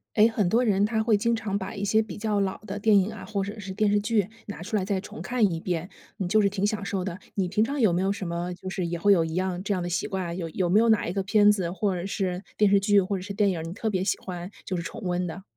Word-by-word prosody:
哎， 215 +1 +7
很 210 -5 0
多 230 +5 +3
人 205 -4 +3
他 220 0 0
会 220 -1 +3
经 230 +3 +1
常 220 -3 -1
把 190 0 -5
一 200 - -3
些 215 +2 +3
比 220 - -7
较 210 -1 0
老 190 -1 -1
的 200 0 -5
电 205 0 +5
影 195 +3 0
啊， 220 - -9
或 200 -3 -2
者 205 +3 -6
是 195 - -6
电 210 +1 +2
视 205 - +3
剧 210 -2 +1 0.2
拿 205 -5 -7
出 210 +6 -4
来 200 - +1
再 195 0 -1
重 210 +3 -9
看 230 -7 +1
一 - - -2
遍， 175 0 -2 0.3
嗯， 190 - -1
就 215 +4 +4
是 200 - +3
挺 200 +1 0
享 210 -1 -2
受 195 -1 -2
的。 180 -2 -4 0.2
你 190 -3 0
平 205 +4 +2
常 280 +5 -2
有 215 -8 +4
没 175 - +1
有 195 +1 +1
什 195 -2 -4
么 170 +1 -3
就 185 +1 -7
是 185 -1 -2
也 170 0 -3
会 200 +4 +5
有 170 -4 +3
一 160 0 -4
样 185 0 -1
这 200 - 0
样 185 - -1
的 175 - -3
习 175 - -1
惯？ 185 -3 -3
有 170 -3 -4
有 180 +3 -1
没 205 +5 +5
有 230 - +3
哪 220 -2 +3
一 170 - -2
个 195 0 -1
片 205 +1 +5
子， 190 -5 +1
或 190 +1 0
者 175 0 -4
是 190 -2 -2
电 210 -1 +4
视 200 - +5
剧， 205 +1 +4
或 195 +2 -2
者 - - -6
是 200 +2 -6
电 200 0 +2
影 175 - -3
儿， - - -5
你 165 - -6
特 220 +4 -2
别 185 -3 0
喜 195 - +1
欢 180 0 -7
就 185 - -2
是 170 - -3
重 225 - -7
温 180 -1 -1
的？ 175 +3 -7
195 Hz, 345 characters per minute, -26 LUFS, 180-210 Hz, 0.3 s, 哎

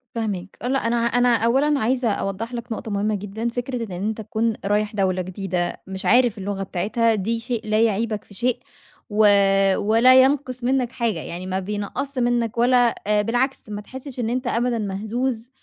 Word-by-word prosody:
فاهماك، 200 -5 -4
لأ 260 +3 0
أنا 235 - +1
أنا 240 +1 +3
أولًا 270 +6 +2
عايزة 245 +2 +1
أوضّح 200 +4 -3
لك 235 0 -6
نقطة 220 0 -4
مهمة 205 +1 0
جدًا، 205 +4 -4
فكرة 245 0 -3
إن 205 - -11
أنت 210 +5 -3
تكون 220 +2 -1
رايح 210 +1 0
دولة 185 -2 +1
جديدة 185 -1 -3
مش 190 +1 -6
عارف 240 +2 +4
اللغة 195 0 -3
بتاعتها 220 +5 0
دي 220 +3 -1
شيء 230 -2 -3
لا 215 +1 +2
يعيبك 220 -1 0
في - - -17
شيء، 245 +4 0 0.5
و 215 0 +3 0.5
ولا 230 +5 +6
ينقص 260 -2 0
منك 250 -1 +1
حاجة، 230 -9 -1
يعني 175 +3 -6
ما 190 0 -2
بينقصّش 210 +8 -4
منك 240 -1 0
ولا 245 0 +4
آآ، 210 0 +3
بالعكس 245 +5 0
ما 205 0 -5
تحسش 260 +3 -9
إن 230 -2 -1
أنت 250 +1 -2
أبدًا 240 0 0
مهزوز 220 +4 -3
230 Hz, 175 wpm, -22 LUFS, 205-245 Hz, 0.5 s, ولا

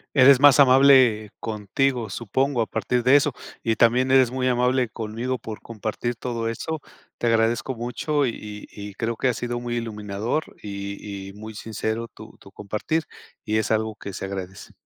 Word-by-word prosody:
Eres 130 -1 +7
más 145 0 +7
amable 130 -5 +6
contigo 110 +2 -1
supongo 120 +5 0
a - - -2
partir 125 +2 -1
de 130 +2 +6
eso 145 -1 +4 0.3
y 115 -1 0
también 125 +3 +3
eres 130 -2 +5
muy 130 -1 0
amable 125 0 +2
conmigo 115 +4 -4
por 110 -1 -8
compartir 115 +2 -4
todo 115 -1 -3
eso. 155 +7 -4 0.4
Te 120 - 0
agradezco 115 +3 +1
mucho 135 +5 -1
y - - +1
y 105 -1 -9
y 100 -1 -8
creo 115 +2 -2
que 130 - +1
ha 125 - +1
sido 120 +1 -3
muy 120 0 -3
iluminador 110 +3 -2 0.2
y 100 -1 -6
y 95 - -9
muy 110 +1 -9
sincero 110 +2 -3
tu 110 0 -13
tu 95 - -15
compartir, 105 +11 -2 0.4
y 110 +1 0
es 110 - -1
algo 110 0 0
que 100 -1 -8
se - - -6
agradece. 95 0 -7
115 Hz, 180 wpm, -24 LUFS, 105-130 Hz, 0.4 s, Eres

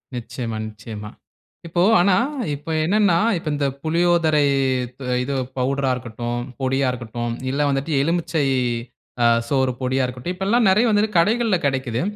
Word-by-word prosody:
நிச்சியமா 120 -1 -5
நிச்சியமா. 105 0 -8 0.6
இப்போ 175 +1 0 0.2
ஆனா, 185 +1 +4 0.4
இப்ப 150 +3 -10 0.2
என்னனா 200 -2 +3 0.2
இப்ப 165 - -8
இந்த 145 -1 -1 0.2
புளியோதரை 165 -2 +2 0.4
இத் 125 +2 -12 0.2
இது 140 +2 -3 0.2
பவுடரா 135 +1 0
இருக்கட்டும், 120 0 -4 0.2
பொடியா 135 0 +1
இருக்கட்டும் 120 -1 -4 0.2
இல்ல 140 +2 -1
வந்துட்டு 135 +3 -1
எலுமிச்சை 165 -2 0 0.8
ஆ - - +5 0.2
சோறு 130 -1 +1
பொடியா 130 +1 0
இருக்கட்டும். 125 +8 -5
இப்ப 190 +1 -4
எல்லாம் 235 0 +3
நெறைய 215 +6 +4
வந்துட்டு 210 -1 +1
கடைகள்ல 215 +2 +3
கிடைக்கிது. 130 -4 -1
140 Hz, 140 wpm, -21 LUFS, 125-175 Hz, 0.8 s, ஆ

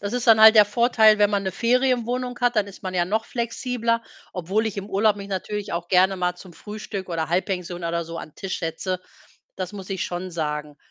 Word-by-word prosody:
Das 205 +4 -4
ist 245 -1 -2
dann 220 -1 +7
halt 220 +1 +10
der 210 -1 +8
Vorteil, 220 0 +4
wenn 205 -1 +5
man 200 -1 0
'ne 190 -2 -3
Ferienwohnung 250 0 0
hat, 245 -1 +2
dann 205 -1 +2
ist 200 - -13
man 185 -1 -4
ja 175 -1 +2
noch 220 +4 -1
flexibler, 235 -1 -1 0.3
obwohl 195 +5 -1
ich 205 -2 -4
im 200 +1 -6
Urlaub 205 +1 +2
mich 200 0 -8
natürlich 205 0 -4
auch 170 0 -3
gerne 190 +1 +4
mal 180 0 -1
zum 180 -1 -14
Frühstück 205 -3 -7
oder 160 -2 -2
Halbpension 180 -1 -2
oder 170 0 -1
so 165 0 -7
an 155 - -8
Tisch 195 -1 -4
setze. 175 +3 -3 0.5
Das 185 +1 -5
muss 195 -1 -9
ich 190 -1 -2
schon 180 +1 -5
sagen. 150 -3 -4
200 Hz, 220 wpm, -23 LUFS, 180-220 Hz, 0.5 s, halt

